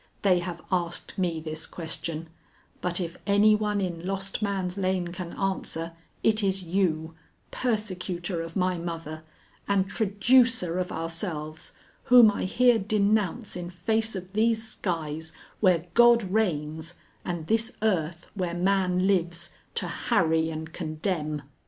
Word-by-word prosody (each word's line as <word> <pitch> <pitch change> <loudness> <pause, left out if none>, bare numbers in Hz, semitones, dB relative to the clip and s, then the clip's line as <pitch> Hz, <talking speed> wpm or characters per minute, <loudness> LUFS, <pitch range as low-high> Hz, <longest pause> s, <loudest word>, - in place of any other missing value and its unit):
They 185 -3 +5
have 175 -1 -5
asked 175 -2 -1
me 175 -4 0
this 155 0 -5
question, 165 -1 -4 0.5
but 175 0 0
if 170 -2 -4
any 205 +2 +6
one 210 -1 +1
in 175 -3 -3
Lost 195 +2 -3
Man's 190 -3 -1
Lane 185 -2 0
can 175 -1 -6
answer, 175 -4 -2 0.3
it 220 0 +3
is 195 -1 0
you, 165 -3 0 0.4
persecutor 185 -6 -2
of 165 0 -7
my 185 -2 +1
mother, 165 -2 -5 0.5
and 195 -1 +2
traducer 220 -2 +3
of 180 - -2
ourselves, 160 -2 -4 0.3
whom 240 -3 +8
I 200 - -2
here 240 +4 +4
denounce 210 +1 +1
in 175 -1 -5
face 220 +5 0
of 185 0 -7
these 220 +1 +2
skies 160 -6 -3 0.3
where 180 -4 +3
God 240 +1 +6
reigns 165 -5 -1 0.3
and 175 -3 -3
this 225 +6 +1
earth 170 -5 0
where 180 -4 -2
man 185 0 +2
lives 175 -3 0 0.2
to - - 0
harry 160 -1 +1
and 160 0 -6
condemn." 155 -2 -2
180 Hz, 135 wpm, -27 LUFS, 165-200 Hz, 0.5 s, whom